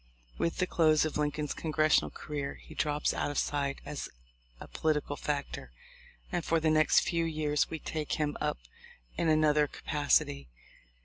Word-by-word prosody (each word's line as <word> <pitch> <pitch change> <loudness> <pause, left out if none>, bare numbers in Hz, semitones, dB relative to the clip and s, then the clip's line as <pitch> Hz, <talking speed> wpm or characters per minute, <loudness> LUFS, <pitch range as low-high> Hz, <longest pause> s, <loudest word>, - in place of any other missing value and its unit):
With 165 - 0
the 185 - +2
close 155 -3 +3
of 155 - -3
Lincoln's 150 0 -1
congressional 155 -1 +2
career 145 -2 -5
he - - -13
drops 150 0 0
out - - -1
of 145 - -4
sight 140 -1 0
as 145 - -5 0.5
a - - -9
political 150 -2 -1
factor, 140 - -4 0.6
and 175 - -1
for 165 +1 +2
the 160 0 +2
next 155 0 +5
few 170 -1 0
years 155 -2 0
we 160 - -3
take 155 -1 -4
him 150 -1 0
up - - 0 0.6
in 165 - +1
another 150 -1 +4
capac 145 0 +2
ity. 70 -2 -8
150 Hz, 165 wpm, -31 LUFS, 145-155 Hz, 0.6 s, next